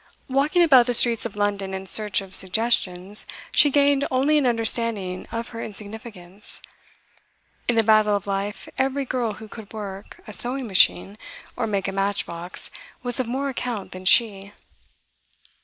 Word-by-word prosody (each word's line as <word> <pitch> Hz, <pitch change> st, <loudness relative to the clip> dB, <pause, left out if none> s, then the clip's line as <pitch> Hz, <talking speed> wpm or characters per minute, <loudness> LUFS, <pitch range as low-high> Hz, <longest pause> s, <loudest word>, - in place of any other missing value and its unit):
Walking 290 Hz, +7 st, +2 dB
about 260 Hz, -7 st, +6 dB
the 245 Hz, -, +3 dB
streets 235 Hz, -1 st, +4 dB
of 205 Hz, -, -16 dB
London 200 Hz, -2 st, -2 dB
in 190 Hz, 0 st, -6 dB
search 210 Hz, +1 st, +1 dB
of 190 Hz, -1 st, -12 dB
suggestions, 190 Hz, -1 st, +1 dB, 0.2 s
she 290 Hz, -, +5 dB
gained 280 Hz, 0 st, +3 dB
only 280 Hz, +4 st, +2 dB
an 270 Hz, -, +1 dB
understanding 225 Hz, -5 st, 0 dB
of 230 Hz, 0 st, -5 dB
her 230 Hz, -1 st, -7 dB
insignificance. 205 Hz, -2 st, -6 dB, 1.1 s
In 240 Hz, -, +2 dB
the 225 Hz, -, +3 dB
battle 215 Hz, -1 st, +4 dB
of 200 Hz, -, -3 dB
life 200 Hz, +1 st, -4 dB
every 270 Hz, +1 st, 0 dB
girl 240 Hz, -4 st, -2 dB
who 220 Hz, +1 st, -11 dB
could 215 Hz, -1 st, -12 dB
work 200 Hz, -3 st, -8 dB
a 215 Hz, -, -10 dB
sewing 255 Hz, +4 st, +1 dB
machine 195 Hz, 0 st, +2 dB, 0.4 s
or -, -, -2 dB
make 200 Hz, -2 st, -2 dB
a -, -, -2 dB
matchbox 195 Hz, -3 st, -3 dB, 0.3 s
was 245 Hz, 0 st, +3 dB
of 255 Hz, -, -1 dB
more 265 Hz, +4 st, -2 dB
account 245 Hz, -6 st, -5 dB
than 185 Hz, 0 st, -9 dB
she. 200 Hz, -1 st, +3 dB
215 Hz, 155 wpm, -23 LUFS, 195-245 Hz, 1.1 s, about